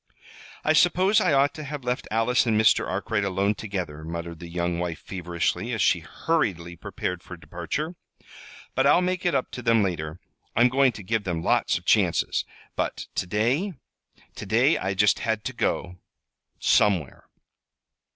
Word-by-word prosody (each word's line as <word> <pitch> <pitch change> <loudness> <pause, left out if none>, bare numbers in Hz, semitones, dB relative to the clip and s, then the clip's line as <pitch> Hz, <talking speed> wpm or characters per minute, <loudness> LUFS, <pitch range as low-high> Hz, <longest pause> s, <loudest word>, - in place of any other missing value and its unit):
"I 155 - +3
suppose 185 +5 +4
I 180 - +2
ought 140 +1 +3
to 155 - -7
have 145 -1 -6
left 125 +1 -2
Alice 115 +3 +2
and 110 -2 +3
Mr. 110 +1 +4
Arkwright 100 +2 -1
alone 100 +1 +1
together," 90 -8 -5
muttered 85 0 -6
the 85 - -8
young 85 0 -2
wife 85 -2 -2
feverishly, 90 -3 -2
as - - -1
she - - +3
hurriedly 90 - -2
prepared 90 0 -4
for 90 - -10
departure. 90 - -4 0.8
"But - - +2
I'll 180 - +5
make 180 0 -1
it 175 - +1
up 130 - -1
to 125 - -6
them 115 -2 +3
later. 85 -3 -3 0.4
I'm 120 +3 +5
going 135 0 +4
to 105 - -9
give 110 +2 -1
them 85 -3 -3
lots - - +2
of - - -11
chances. - - +2 0.3
But - - -2
to - - -2
day 125 - 0 0.6
to - - -6
day 120 +9 +4
I 95 +1 -2
just 105 +1 +3
had 110 -2 -1
to 130 - -4
go 90 -6 -2 0.6
somewhere!" 90 -10 +2
105 Hz, 170 wpm, -25 LUFS, 90-130 Hz, 0.8 s, I'll